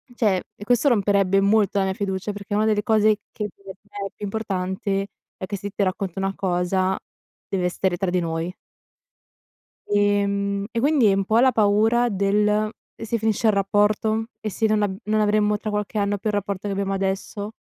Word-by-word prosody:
cioè 210 Hz, -6 st, +2 dB, 0.2 s
e 205 Hz, -, -10 dB
questo 245 Hz, +5 st, +2 dB
romperebbe 200 Hz, -3 st, +3 dB
molto 200 Hz, 0 st, +3 dB
la -, -, +2 dB
mia 190 Hz, -, -1 dB
fiducia 190 Hz, 0 st, -3 dB
perché 205 Hz, 0 st, -5 dB
una 215 Hz, -, +2 dB
delle 210 Hz, -1 st, +1 dB
cose 215 Hz, -1 st, +3 dB, 0.2 s
che 210 Hz, -1 st, -3 dB
per 200 Hz, -, -28 dB, 0.2 s
me 205 Hz, -1 st, -6 dB
è -, -, -11 dB
più -, -, -11 dB
importante 195 Hz, -1 st, -2 dB, 0.3 s
è -, -, -6 dB
che 200 Hz, +2 st, -4 dB
se 200 Hz, +1 st, -6 dB
ti 200 Hz, 0 st, -1 dB
racconto 190 Hz, 0 st, -2 dB
una 195 Hz, 0 st, -1 dB
cosa 185 Hz, +1 st, 0 dB, 0.5 s
dev'esser 180 Hz, -1 st, 0 dB
tra 195 Hz, -2 st, -1 dB
di 180 Hz, 0 st, +1 dB
noi 165 Hz, +1 st, -3 dB, 1.3 s
ehm, 200 Hz, -1 st, +1 dB
e 230 Hz, -, 0 dB
quindi 285 Hz, -3 st, +3 dB
è 200 Hz, -, +5 dB
un 195 Hz, 0 st, 0 dB
po' 220 Hz, +3 st, +2 dB
la 260 Hz, 0 st, +5 dB
paura 220 Hz, +3 st, +3 dB
del: 210 Hz, +1 st, +1 dB, 0.3 s
"E -, -, -7 dB
se 230 Hz, +1 st, -1 dB
finisce 220 Hz, 0 st, +1 dB
il 215 Hz, -, +5 dB
rapporto? 210 Hz, +2 st, +1 dB, 0.2 s
"E 215 Hz, -, -3 dB
se 220 Hz, +3 st, 0 dB
non 215 Hz, -1 st, +2 dB
a 205 Hz, -, +1 dB
non 215 Hz, +1 st, +1 dB
avremmo 210 Hz, 0 st, +2 dB
tra 215 Hz, -, -4 dB
qualche 210 Hz, +1 st, -2 dB
anno 205 Hz, 0 st, +1 dB
più 205 Hz, -, -3 dB
il -, -, -3 dB
rapporto 200 Hz, 0 st, -3 dB
che 200 Hz, -, -2 dB
abbiamo 195 Hz, 0 st, -1 dB
adesso?" 195 Hz, +2 st, -3 dB
205 Hz, 195 wpm, -23 LUFS, 195-215 Hz, 1.3 s, è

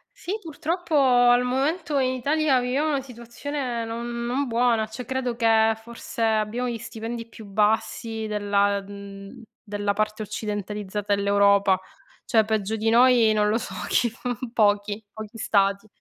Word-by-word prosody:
Sì 375 Hz, -, -6 dB
purtroppo 330 Hz, +1 st, -3 dB
al 245 Hz, -2 st, +5 dB
momento, 280 Hz, +4 st, 0 dB
in 255 Hz, -1 st, +1 dB
Italia, 280 Hz, +1 st, +2 dB
viviamo 260 Hz, +5 st, 0 dB
una 280 Hz, -3 st, 0 dB
situazione 245 Hz, 0 st, -5 dB
non 235 Hz, +1 st, -4 dB
non 265 Hz, +4 st, -1 dB
buona. 230 Hz, -2 st, +2 dB
Cioè 230 Hz, +2 st, -8 dB
credo 260 Hz, -1 st, -2 dB
che 225 Hz, -1 st, +4 dB
forse 235 Hz, 0 st, -6 dB
abbiamo 220 Hz, +3 st, 0 dB
gli 235 Hz, -, -3 dB
stipendi 230 Hz, +1 st, -6 dB
più 225 Hz, -1 st, -12 dB
bassi 220 Hz, +2 st, 0 dB
della 205 Hz, -1 st, +1 dB
uhm, 200 Hz, +1 st, -10 dB, 0.2 s
della 205 Hz, -1 st, -2 dB
parte 215 Hz, +1 st, -1 dB
occidentalizzata 205 Hz, -1 st, -3 dB
dell'Europa. 200 Hz, -1 st, +3 dB, 0.5 s
Cioè 220 Hz, -1 st, +3 dB
peggio 220 Hz, -1 st, -1 dB
di 220 Hz, +1 st, 0 dB
noi 240 Hz, -1 st, +5 dB
non 210 Hz, -1 st, +2 dB
lo 220 Hz, -, +2 dB
so -, -, -7 dB
chi 240 Hz, -, +2 dB
f 225 Hz, -, -19 dB, 0.3 s
pochi, 205 Hz, -1 st, +1 dB
pochi 220 Hz, +1 st, -9 dB
Stati. 200 Hz, 0 st, +1 dB
225 Hz, 145 wpm, -24 LUFS, 210-250 Hz, 0.5 s, al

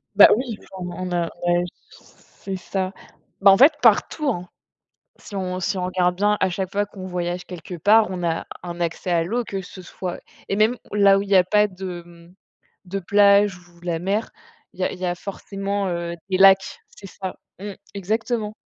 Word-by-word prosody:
Bah 205 Hz, -, +10 dB
oui, 240 Hz, -3 st, -3 dB, 0.2 s
enfin 180 Hz, -2 st, -6 dB
on 185 Hz, 0 st, -3 dB
on -, -, -8 dB
a 175 Hz, -1 st, +1 dB, 0.2 s
ouais 175 Hz, 0 st, +2 dB
j 175 Hz, -, -11 dB, 0.2 s
c'est 195 Hz, -1 st, -10 dB
ça. 190 Hz, +1 st, -3 dB, 0.5 s
Bah 195 Hz, 0 st, +8 dB
en 195 Hz, -, +6 dB
fait, 285 Hz, +7 st, +7 dB
partout 305 Hz, -3 st, +3 dB
hein. 180 Hz, -7 st, -3 dB, 0.7 s
Si -, -, -12 dB
on 185 Hz, -1 st, -3 dB
si 190 Hz, +2 st, -1 dB
on 180 Hz, -, -2 dB
regarde 180 Hz, -1 st, +1 dB
bien, 205 Hz, +2 st, +2 dB
à -, -, +3 dB
chaque 185 Hz, +1 st, -3 dB
fois 205 Hz, +1 st, 0 dB
qu'on 190 Hz, -2 st, -9 dB
voyage 180 Hz, 0 st, -3 dB
quelque 180 Hz, 0 st, -8 dB
part, 210 Hz, +6 st, +5 dB
on 180 Hz, -1 st, -4 dB
a 165 Hz, -1 st, -1 dB, 0.2 s
un 175 Hz, -1 st, -7 dB
accès 170 Hz, +1 st, -2 dB
à 165 Hz, -1 st, +2 dB
l'eau, 240 Hz, +7 st, -1 dB
que 195 Hz, -3 st, -4 dB
ce 185 Hz, 0 st, -11 dB
soit 180 Hz, 0 st, -6 dB, 0.3 s
et 195 Hz, -, -1 dB
même 220 Hz, +4 st, +3 dB, 0.2 s
là 200 Hz, -1 st, +5 dB
où -, -, -1 dB
il 200 Hz, -, -8 dB
y 200 Hz, -, +5 dB
a 185 Hz, -, +6 dB
pas 210 Hz, +3 st, +3 dB
de 185 Hz, -3 st, -7 dB
mmh, 170 Hz, +1 st, -17 dB, 0.5 s
de 195 Hz, +2 st, -3 dB
plage 200 Hz, 0 st, +4 dB
ou 170 Hz, 0 st, -22 dB
la 175 Hz, -2 st, -2 dB
mer, 200 Hz, +5 st, -1 dB, 0.4 s
il -, -, -9 dB
y -, -, +2 dB
a -, -, 0 dB
il 180 Hz, -, -9 dB
y 185 Hz, -, -2 dB
a 175 Hz, 0 st, -1 dB
forcément, 195 Hz, +1 st, -4 dB
heu, 170 Hz, -1 st, -3 dB, 0.2 s
des 185 Hz, -, +1 dB
lacs. 195 Hz, 0 st, +5 dB
C'est 195 Hz, -, -13 dB
ça. 190 Hz, +1 st, -7 dB, 0.2 s
Mmh. 205 Hz, +1 st, -6 dB, 0.2 s
Exactement. 215 Hz, +2 st, -2 dB
190 Hz, 210 wpm, -22 LUFS, 180-200 Hz, 0.7 s, Bah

